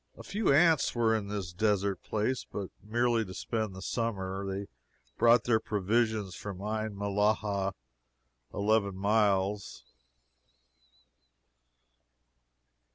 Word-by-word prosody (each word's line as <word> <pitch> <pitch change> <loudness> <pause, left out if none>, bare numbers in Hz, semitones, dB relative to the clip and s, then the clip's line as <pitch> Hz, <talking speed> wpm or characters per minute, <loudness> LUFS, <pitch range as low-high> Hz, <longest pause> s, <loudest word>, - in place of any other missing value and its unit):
A - - -10
few 210 -4 0
ants 160 -1 +4
were 115 -1 +3
in 105 -2 -2
this 100 -4 -4
desert 100 0 +1
place, 110 +4 -1
but 100 -2 -5
merely 120 +1 +1
to 95 -3 -9
spend 110 -4 -3
the 95 - -8
summer. 100 -5 -2
They 100 +1 -4 0.5
brought 120 0 +5
their 115 -2 +3
provisions 105 -1 0
from 95 0 -7
Ain 110 +1 -3
Mellahah 100 -1 0 0.8
eleven 100 -1 +1
miles. 100 -1 +1
105 Hz, 105 wpm, -30 LUFS, 100-110 Hz, 0.8 s, brought